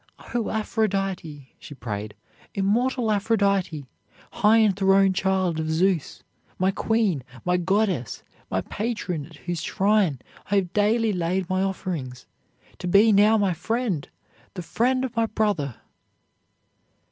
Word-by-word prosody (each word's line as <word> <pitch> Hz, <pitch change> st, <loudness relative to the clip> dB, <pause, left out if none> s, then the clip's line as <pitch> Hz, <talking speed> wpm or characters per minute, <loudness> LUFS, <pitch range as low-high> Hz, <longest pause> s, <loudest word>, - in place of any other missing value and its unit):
"O 240 Hz, -2 st, -1 dB
Aphrodite!" 195 Hz, -, -2 dB
she 145 Hz, -, -11 dB
prayed, 105 Hz, -3 st, -5 dB, 0.4 s
"immortal 225 Hz, +4 st, +1 dB
Aphrodite, 200 Hz, -, +1 dB, 0.5 s
high 220 Hz, 0 st, +4 dB
enthroned 195 Hz, -2 st, +4 dB
child 185 Hz, -3 st, 0 dB
of 160 Hz, 0 st, -2 dB
Zeus, 170 Hz, 0 st, 0 dB, 0.3 s
my 185 Hz, +1 st, +2 dB
queen, 205 Hz, -, 0 dB, 0.2 s
my 180 Hz, 0 st, +2 dB
goddess, 185 Hz, -, 0 dB, 0.3 s
my 95 Hz, -, 0 dB
patron, 180 Hz, -, -4 dB
at 165 Hz, -, -15 dB
whose 175 Hz, +2 st, -4 dB
shrine 195 Hz, -7 st, +2 dB, 0.3 s
I 205 Hz, -, +1 dB
have 190 Hz, -2 st, 0 dB
daily 215 Hz, +1 st, +2 dB
laid 180 Hz, +1 st, -1 dB
my 185 Hz, 0 st, +1 dB
offerings, 170 Hz, -10 st, -4 dB, 0.5 s
to -, -, -4 dB
be 200 Hz, +5 st, +5 dB
now 210 Hz, +2 st, +5 dB
my 200 Hz, -3 st, +1 dB
friend, 195 Hz, -, -2 dB, 0.5 s
the 180 Hz, -, -5 dB
friend 255 Hz, +8 st, +1 dB
of 245 Hz, -2 st, -7 dB
my 230 Hz, 0 st, +2 dB
brother!" 190 Hz, -, -1 dB
195 Hz, 125 wpm, -24 LUFS, 170-215 Hz, 0.5 s, be